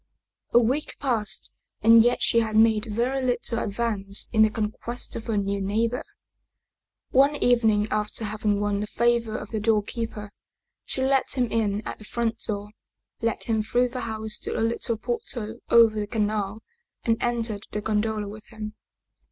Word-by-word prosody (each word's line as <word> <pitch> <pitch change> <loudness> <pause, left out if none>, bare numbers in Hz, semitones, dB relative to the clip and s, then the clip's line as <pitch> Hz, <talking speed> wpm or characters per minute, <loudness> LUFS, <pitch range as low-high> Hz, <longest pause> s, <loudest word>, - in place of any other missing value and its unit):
A - - +4
week 255 +6 -1
passed 225 -7 0 0.3
and 230 +1 +8
yet 240 +2 +2
she 230 - +4
had 220 -1 -1
made 220 0 +4
very 240 +5 -1
little 245 -2 0
advance 200 -2 -2
in 220 - +4
the 220 - +6
conquest 220 +3 -3
of 225 - -6
her 220 -2 0
new 200 0 -1
neighbor. 225 +5 0 1.1
One 275 +3 +5
evening 225 -6 +3
after 215 +1 -1
having 210 -1 0
won 205 -1 0
the 210 - -3
favor 235 -1 +1
of 210 - -8
the 220 - -1
doorkeeper, 210 0 -1 0.5
she 260 - -2
let 270 0 +2
him 245 -3 +1
in 210 -2 0
at - - -6
the 215 - -11
front 230 0 -2
door, 205 -1 -3 0.5
led 230 -1 -1
him 220 -2 0
through 245 +3 +1
the 255 +1 -5
house 220 -1 -1
to - - -2
the - - -1
little 230 0 0
portal 235 -1 -3
over 225 -2 +6
the 205 - -2
canal 210 -1 -1 0.4
and 225 -1 +1
entered 230 -3 -1
the 210 - -2
gondola 215 0 -1
with 210 +1 -10
him. 215 -1 -7
220 Hz, 170 wpm, -25 LUFS, 210-235 Hz, 1.1 s, and